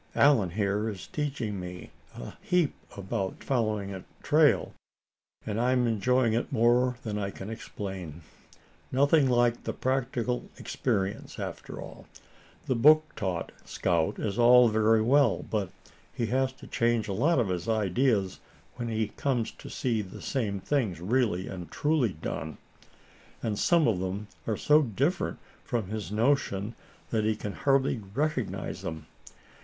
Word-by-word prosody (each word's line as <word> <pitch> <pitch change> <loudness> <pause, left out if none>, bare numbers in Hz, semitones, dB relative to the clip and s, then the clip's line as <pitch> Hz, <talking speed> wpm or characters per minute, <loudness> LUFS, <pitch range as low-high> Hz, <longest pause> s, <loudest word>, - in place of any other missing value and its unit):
Allan, 130 -10 +5
here, 105 +3 0
is 100 -4 -7
teaching 135 -9 -3
me 90 0 -8 0.2
a - - -8
heap 180 -5 +2 0.2
about 95 -1 -3
following 110 -6 -1
a 95 - -7 0.2
trail, - - +3 0.7
and 110 +2 -1
I'm 125 0 +3
enjoying 115 +1 +2
it 115 - -1
more 120 +2 +3
than 105 -2 -3
I 100 -1 -2
can 100 +2 -7
explain. 95 -7 -7 0.7
Nothing 140 +1 +4
like 120 -1 +2
the - - -3
practical 125 -2 -1
experience, 95 +1 -2
after - - -6
all. - - -10 0.6
The - - +1
book 155 +6 +5
taught 95 -6 -3
scout 85 -3 0
is 105 +1 -2
all 120 0 +7
very 110 0 +3
well, 135 -1 +3
but 105 -4 -1 0.4
he 115 - -2
has 130 0 +2
to - - -14
change 115 -1 +1
a 100 - -2
lot 145 - +2
of 115 -6 +1
his 90 +3 -2
ideas 110 -1 +1 0.4
when 120 -1 -3
he 110 -2 -1
comes 125 -1 -1
to - - -12
see 115 -5 -1
the 95 -2 -9
same 105 -7 -2
things 110 - -1
really 105 -1 0
and 90 -3 -7
truly 145 -9 +1
done. 80 0 -5 0.9
And 105 -3 -1
some 170 -3 +4
of 105 -6 +1
them 95 +3 -4 0.2
are 110 -3 0
so 150 +1 +5
different 135 - -1 0.3
from 115 -6 -2
his 105 -2 -4
notion 110 -3 +1 0.4
that 110 -2 +1
he 110 0 +1
can 105 -1 -5
hardly 135 -3 +1
recognize 145 -5 -2
'em. 80 -2 -5
110 Hz, 150 wpm, -28 LUFS, 100-130 Hz, 0.9 s, all